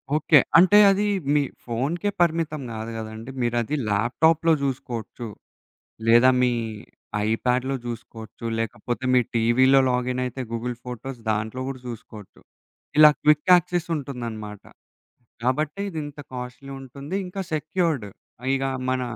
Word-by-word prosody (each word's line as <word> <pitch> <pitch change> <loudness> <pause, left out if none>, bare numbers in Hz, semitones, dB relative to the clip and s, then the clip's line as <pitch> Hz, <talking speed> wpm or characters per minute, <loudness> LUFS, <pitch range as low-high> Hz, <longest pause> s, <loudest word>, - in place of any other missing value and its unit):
Okay. 155 0 +5 0.2
అంటే 185 +4 +7
అది 200 +2 +1 0.3
మీ 150 - +4 0.2
ఫోనుకే 140 - -1
పరిమితం 160 -3 +1
గాదు 110 0 -5
గదండి! 110 +3 -7
మీరది 120 +3 0
ల్యాప్‌టాప్‌లో 160 +10 +3
జూసుకోవచ్చు. 120 -3 -4 0.8
లేదా 120 +3 +7
మీ 125 -1 +3 0.7
ఐ - - 0 0.2
ప్యాడ్ 125 +1 +2 0.2
జూసుకోవచ్చు. 115 -1 -8
లేకపోతే 115 +3 -3
మీ 125 - +6 0.2
టీవీలో 130 +4 +5
లాగినయితే 125 0 -1
గూగుల్ 120 +1 -3
ఫోటోస్ 125 +1 -7
దాంట్లో 110 +4 -2
గూడా 135 -2 -6
జూసుకోవచ్చు. 110 -3 -10 0.6
ఇలా 155 0 +10
క్విక్ 150 +2 +3
యాక్సెసుంటుందనమాట. 135 - -1 0.8
కాబట్టి, 150 +8 -1
ఇదింత 150 -4 -6 0.2
కాస్ట్‌లి 125 +2 -7
ఉంటుంది. 140 +6 -6
ఇంకా 180 +2 -6
సెక్యూర్డ్. 155 - -1 0.5
ఇగ 135 0 -1 0.3
మన, 130 0 0
130 Hz, 115 wpm, -24 LUFS, 115-150 Hz, 0.8 s, ఇలా